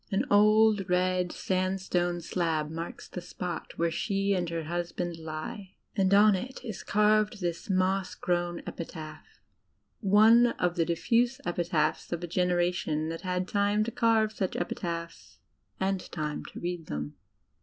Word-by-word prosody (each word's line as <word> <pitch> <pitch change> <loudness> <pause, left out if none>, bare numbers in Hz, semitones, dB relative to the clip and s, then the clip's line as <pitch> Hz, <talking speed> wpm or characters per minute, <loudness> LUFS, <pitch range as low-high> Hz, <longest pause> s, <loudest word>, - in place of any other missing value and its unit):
An 195 - +1
old, 215 -1 +5
red 180 0 +1
sandstone 185 -2 -1
slab 160 -3 -1
marks 165 +1 -6
the 180 - -7
spot 175 -1 -6
where 170 0 +1
she 200 +3 0
and 180 -3 -1
her 165 -1 -3
hus 170 +2 -3
band 175 -2 -4
lie, 160 +5 -7 0.2
and 190 -1 +2
on 205 +1 +7
it 245 +8 -4
is 220 -5 -5
carved 210 +1 +2
this 175 -1 -3
moss 190 0 +1
grown 175 -1 -1
epitaph 155 -2 -8 0.3
— - - -47 0.2
one 230 +3 +7
of 175 -1 0
the 165 -2 +2
diffuse 235 +9 +1
epitaphs 170 -3 0
of 170 0 -3
a - - -3
generation 175 -3 0
that 165 0 -5
had 180 0 -2
time 205 +1 +2
to 230 - -3
carve 225 -2 +3
such 195 -4 -3
epitaphs 170 -1 -5 0.4
and 190 -1 -1
time 150 -2 -3
to - - -9
read 175 -2 -4
them. 75 0 -4
180 Hz, 155 wpm, -29 LUFS, 170-200 Hz, 0.4 s, on